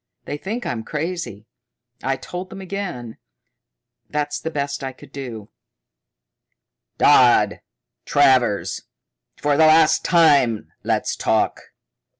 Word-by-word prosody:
They - - -4
think 225 +8 -5
I'm 115 -2 -3
crazy. 150 - -5 0.6
I 135 0 0
told 180 +6 -7
them 195 - -9
again. 180 - -6 0.9
That's 150 -1 -2
the 160 - -4
best 140 -2 -3
I 135 -1 -4
could - - -16
do." 115 -6 -8 1.5
"Dodd! - - +4 0.4
Travers! 130 -7 +2 0.6
For 145 -1 +1
the 160 - +6
last 155 0 +5
time 140 - +3
let's - - -1
talk!" - - 0
145 Hz, 110 wpm, -21 LUFS, 125-165 Hz, 1.5 s, the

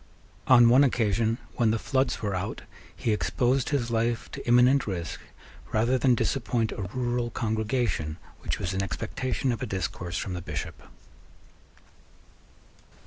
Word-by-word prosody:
On 120 -2 +8
one 125 +4 +6
occasion, 115 -3 +1 0.2
when 115 -3 +3
the 110 - +2
floods 130 0 0
were 100 -2 -1
out, 90 -1 -4 0.3
he 115 - -1
exposed 125 +4 +1
his 130 -5 -1
life 115 0 -1
to - - -8
imminent 125 +2 +5
risk 85 -4 -4 0.5
rather 115 +4 +2
than 125 -2 +4
disappoint 120 -2 0
a 95 -3 -5
rural 120 -1 -1
congregation 110 - -1 0.2
which - - -3
was 95 +1 -3
in 95 - 0
expectation 95 +9 -2
of 115 - -4
a 130 - -2
discourse 90 -2 -3
from 95 - -3
the 90 - -4
Bishop. - - -6
115 Hz, 140 wpm, -27 LUFS, 100-125 Hz, 0.5 s, On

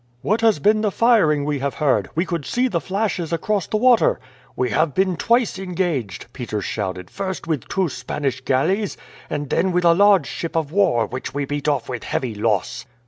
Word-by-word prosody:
"What 215 +3 +1
has 225 -5 +4
been 215 +8 +3
the 215 - +1
firing 195 -11 +3
we 145 -1 -1
have 140 +1 -2
heard? 130 - +1
We 170 +3 +1
could 170 -5 -3
see 250 - 0
the 170 -9 -1
flashes 195 -4 -2
across 195 +4 -1
the 215 - 0
water." 245 0 +4 0.4
"We 125 -2 -1
have 155 +5 +1
been 185 -1 +2
twice 235 +1 +1
engaged," 175 - -2
Peters 110 -6 -4
shouted; 95 -4 -4
"first 190 -3 -4
with 160 -6 -2
two 195 -3 0
Spanish 130 0 -3
galleys, 185 +11 0 0.3
and 145 -2 -4
then 185 +1 +2
with 180 0 +1
a 170 - +7
large 200 -3 +5
ship 165 +4 -5
of 155 -3 -1
war, 125 - +2
which 130 +2 -6
we 145 0 -1
beat 145 +1 -4
off 140 -5 0
with 125 -2 -5
heavy 125 -4 -2
loss." 110 +3 -1
165 Hz, 195 wpm, -21 LUFS, 130-195 Hz, 0.4 s, a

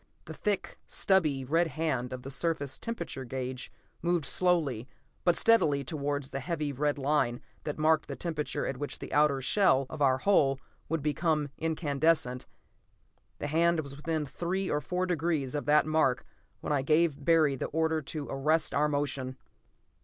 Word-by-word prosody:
The - - -7
thick, 205 -3 -2
stubby 155 -9 +2
red 165 +6 +2
hand 145 -6 -2
of 130 -1 -6
the 135 - -7
surface 140 -2 -1
temperature 230 - -5
gauge 130 0 -5 0.3
moved 175 -3 +1
slowly 145 -8 +1 0.4
but 175 -1 +4
steadily 150 -12 +4
towards 145 -1 -3
the 135 - -3
heavy 150 +1 -2
red 145 +2 0
line 135 -4 +1 0.3
that 150 - -3
marked 155 0 +2
the - - -5
temperature 160 -4 -3
at 135 - -3
which 145 +2 -4
the - - -8
outer 145 -2 +3
shell 135 -1 +3
of 150 - -6
our 130 -2 +4
hull 135 -5 +3 0.3
would 160 -2 -1
become 150 0 0
incandescent. 155 -4 0 0.9
The - - -5
hand 165 +2 +2
was 140 -2 -8
within 155 +1 -2
three 185 +6 -2
or 150 - 0
four 180 +5 -1
degrees 160 -6 -1
of 145 -1 -3
that 150 +1 +5
mark 155 -5 +1 0.4
when - - -1
I 140 - +2
gave 155 0 +2
Barry 155 -3 +4
the - - -3
order 160 0 0
to 150 0 -6
arrest 155 +4 +1
our 145 +3 +3
motion. 140 -3 -2
150 Hz, 165 wpm, -30 LUFS, 135-165 Hz, 0.9 s, that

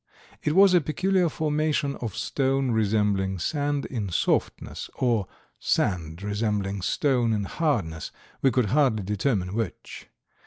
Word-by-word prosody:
It 150 - 0
was 195 -1 +7
a 175 - +5
peculiar 180 +3 +1
formation 150 -2 0
of 110 -5 -5
stone 135 +1 0
resembling 105 -3 +1
sand 145 - -1
in 110 -7 -3
softness 85 - -1
or 115 -6 +1 0.3
sand 85 -2 -1
resembling 105 -1 -1
stone 125 +2 +1
in 105 -1 0
hardness, 100 - -1 0.3
we 135 - +5
could 120 -4 +1
hardly 130 -8 +3
determine 100 -1 -1
which. 110 -5 -5
115 Hz, 125 wpm, -26 LUFS, 100-145 Hz, 0.3 s, was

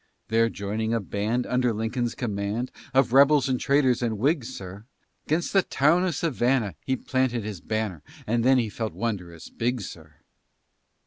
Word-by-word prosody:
There 115 +1 +3
joining 110 +2 -2
a - - +1
band 110 +4 -1
Under 125 -1 +1
Lincoln's 115 +2 -2
command, 105 +2 -2 0.2
Of 130 -2 +3
rebels 140 +1 +6
and 130 -2 0
traitors 135 -3 +2
and 115 -3 -1
Whigs, 135 - +1
sir, 95 +2 -9 0.4
'Gainst 165 +3 0
the 195 - +6
town 165 +3 +2
of 175 -4 -1
Savannah 125 - +1
He 130 - +2
planted 130 -3 -1
his 105 -4 -6
banner, 110 -7 -3 0.2
And 115 +1 +1
then 130 +2 +5
he 120 -3 +1
felt 110 +1 -4
wondrous 90 -8 -4
big, 120 +2 -1
sir. 80 -6 -10
115 Hz, 165 wpm, -26 LUFS, 105-130 Hz, 0.4 s, rebels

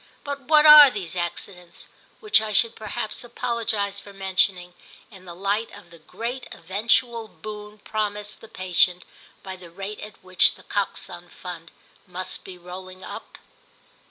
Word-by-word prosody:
But 285 -1 -4
what 305 0 +6
are 300 -2 +12
these 185 -8 -4
accidents, 175 0 -5 0.3
which 425 - +4
I 215 -1 -3
should 230 +3 +2
perhaps 215 +1 -4
apologise 220 -4 -2
for 200 - -12
mentioning, 190 -2 0 0.4
in 190 -3 -13
the 175 -1 -8
light 200 +4 0
of 205 - -16
the 170 - -14
great 235 +10 -5
eventual 225 +5 0
boon 210 -1 -9
promised 210 0 -3
the 225 - -11
patient 180 -2 +2 0.4
by 190 -1 -6
the 180 -2 -12
rate 195 +4 -6
at 210 -2 -10
which 185 0 +3
The - - -16
Coxon 175 -3 -3
Fund 170 -2 -8 0.4
must 185 +1 -4
be 185 -1 -9
rolling 185 +1 -10
up? - - -8
200 Hz, 150 wpm, -25 LUFS, 180-220 Hz, 0.4 s, are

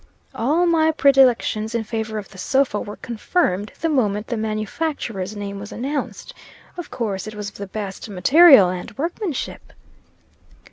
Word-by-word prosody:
All 300 +10 +1
my 325 -2 +3
predilections 255 -6 +3
in 230 - 0
favor 220 -1 -4
of 205 - -6
the 190 - -13
sofa 265 0 +1
were 205 - -7
confirmed 215 - -1
the 330 - +1
moment 215 -9 0
the 240 - -3
manufacturer's 215 - -3
name 200 -1 -5
was 205 +1 -9
announced. 285 - -4 0.4
Of 350 -3 -7
course, 215 -5 -3
it 215 - -7
was 210 -1 -5
of - - -15
the 200 - -6
best 200 +1 -6
material 265 - +7
and 180 +6 -6
workmanship. 335 - -4
220 Hz, 150 wpm, -21 LUFS, 205-280 Hz, 0.4 s, material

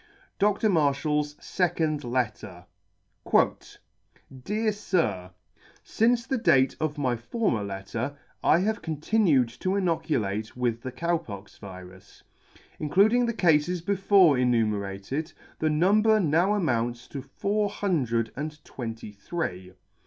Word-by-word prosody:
Dr. 210 +2 +2
MARSHALL'S 150 -3 +1
SECOND 160 -5 -1
LETTER. 110 -7 -3 1.8
Dear 215 - 0
Sir, 160 - -1 0.3
" - - -34 0.2
Since 235 +1 +1
the 265 -2 -1
date 135 -10 +3
of 155 -1 -2
my 130 -4 0
former 120 - -1
letter, 100 +8 -5 0.3
I - - +5
have 215 +3 -1
continued 160 - +2
to 185 +1 0
inoculate 155 - -1
with 120 -2 -1
the 130 - -5
Cow 170 +5 0
pox 100 - -11
virus. 95 -1 -12 0.6
Including 215 +10 +3
the 235 - -2
cafes 170 -1 +2
before 190 -5 +4
enumerated, 110 - -1 0.3
the 160 - +1
number 210 +8 +4
now 175 +4 +2
amounts 120 - -1
to 140 - -6
four 200 +10 -1
hundred 130 - -1
and 150 +2 -6
twenty 115 -4 -7
three. 100 - -5
150 Hz, 115 wpm, -26 LUFS, 115-190 Hz, 1.8 s, I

